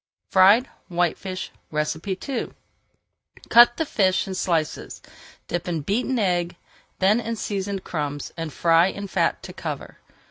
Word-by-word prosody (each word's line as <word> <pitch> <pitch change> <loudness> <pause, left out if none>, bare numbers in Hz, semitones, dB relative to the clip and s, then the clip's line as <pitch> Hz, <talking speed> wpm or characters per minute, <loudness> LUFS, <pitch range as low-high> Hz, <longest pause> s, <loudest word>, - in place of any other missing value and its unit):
FRIED 200 +7 +6 0.2
WHITEFISH 180 +1 -2 0.2
II 185 - -2 1.0
Cut 240 0 +7
the 320 - 0
fish 190 -9 +1
in 190 - -4
slices, 165 -4 -2 0.5
dip 175 0 -3
in 165 -3 -1
beaten 240 - -1
egg, 175 -5 0 0.4
then 200 +4 +3
in 230 0 -3
seasoned 200 -2 -3
crumbs, 145 -3 -4
and 165 -2 -5
fry 165 +5 +4
in 200 +1 -5
fat - - 0
to - - -8
cover. - - -6
185 Hz, 130 wpm, -24 LUFS, 170-205 Hz, 1.0 s, Cut